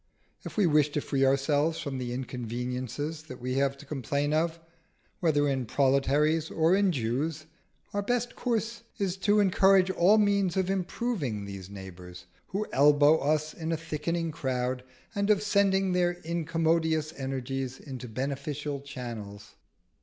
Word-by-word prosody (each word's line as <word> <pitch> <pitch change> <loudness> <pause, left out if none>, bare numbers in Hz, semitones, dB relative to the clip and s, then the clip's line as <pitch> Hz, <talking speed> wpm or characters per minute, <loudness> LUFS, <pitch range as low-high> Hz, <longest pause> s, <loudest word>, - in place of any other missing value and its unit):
If - - -8
we 205 - +4
wish 150 -3 +4
to - - +1
free 140 -2 0
ourselves 145 +4 +2
from 140 -3 -4
the 125 -1 -3
inconveniences 125 +4 -4
that 130 -4 -9
we 125 +1 -3
have 140 0 +1
to 145 - -13
complain 145 +1 -1
of, 165 +1 0 0.6
whether 145 -4 +2
in 130 -4 -1
proletaries 145 +5 +2
or 165 +3 +3
in 200 -1 +3
Jews, 145 +4 -2 0.5
our 205 - 0
best 245 +3 -1
course 230 -1 -2 0.2
is 195 -4 -1
to 205 +2 +3
encourage 190 -1 +4
all 190 +4 +5
means 200 -3 +2
of 190 0 +1
improving 180 - -2
these 100 -2 -8
neighbours 90 -2 -10 0.2
who 205 +3 -2
elbow 145 +2 +5
us 155 +2 0
in 160 0 -4
a 165 - 0
thickening 165 +1 -2
crowd, 125 -3 -2 0.3
and 200 -1 0
of 210 -1 +4
sending 195 -2 +2
their 175 -1 +2
incommodious 160 -1 0
energies 135 -1 -4
into 130 -3 -8
beneficent 140 +3 -4
channels. 115 -7 -7
150 Hz, 145 wpm, -28 LUFS, 130-175 Hz, 0.6 s, all